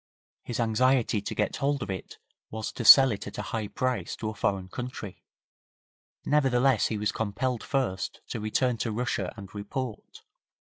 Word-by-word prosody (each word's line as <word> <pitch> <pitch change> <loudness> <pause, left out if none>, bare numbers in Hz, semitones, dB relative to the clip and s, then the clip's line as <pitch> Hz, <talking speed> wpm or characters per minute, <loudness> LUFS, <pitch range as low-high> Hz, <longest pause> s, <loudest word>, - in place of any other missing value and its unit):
His 120 - -5
anxiety 120 -1 +2
to - - -5
get 105 - -1
hold 140 -1 0
of 95 - -4
it 95 - -7 0.3
was 110 0 -4
to 120 - -5
sell 135 +3 +10
it 105 - -5
at 100 - -8
a - - -3
high 110 -2 -1
price 130 +3 -2
to 110 - -4
a - - -5
foreign 95 -3 -1
country, 120 -2 -7 1.0
nevertheless 135 -4 +3
he 110 - -2
was 105 0 0
compelled 115 +3 -2
first 130 -10 -2
to 115 - -3
return 115 +3 0
to 115 - -2
Russia 110 -5 -2
and 100 -2 -10
report. 110 +3 -6
115 Hz, 170 wpm, -28 LUFS, 105-130 Hz, 1.0 s, sell